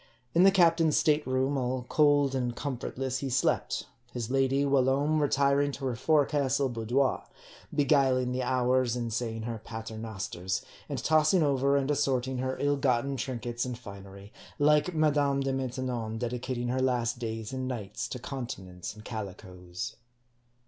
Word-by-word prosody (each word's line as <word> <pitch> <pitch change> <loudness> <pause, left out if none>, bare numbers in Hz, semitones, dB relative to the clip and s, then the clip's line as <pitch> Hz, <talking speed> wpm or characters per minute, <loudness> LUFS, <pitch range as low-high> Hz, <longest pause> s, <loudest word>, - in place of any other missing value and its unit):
In 170 - +4
the 195 - +8
captain's 165 -4 +4
state 150 -2 +2
room, 130 +2 +1
all 125 0 -2
cold 145 -2 +3
and 125 -2 -1
comfortless, 130 -1 -3
he 135 - -3
slept; 125 0 0 0.3
his 120 -1 -4
lady 135 +1 +2
whilome 140 +3 +2
retiring 140 0 +2
to 135 - -5
her 125 -2 -1
forecastle 140 0 +2
boudoir; 120 +3 0 0.5
beguiling 135 -3 +3
the 130 +1 -1
hours 125 -1 +1
in 120 -2 -3
saying 115 -1 -3
her 115 -1 -5
pater 110 -1 -7
nosters, 95 -3 -4 0.3
and 140 - -3
tossing 155 +3 +4
over 140 -1 +2
and 140 +1 0
assorting 130 -3 0
her 130 +1 -2
ill 145 0 +1
gotten 135 0 +1
trinkets 120 -2 -3
and 125 -2 -4
finery; 100 -2 -11 0.2
like 150 +4 +3
Madame 145 -3 +2
De 135 0 -1
Maintenon 125 -4 -3
dedicating 120 +1 -3
her 130 +1 0
last 120 -2 0
days 110 -1 -4
and 130 -1 -3
nights 120 -1 -4
to 125 - -5
continence 115 -9 -6
and 105 0 -13
calicoes. 90 -5 -7
130 Hz, 150 wpm, -29 LUFS, 120-140 Hz, 0.5 s, the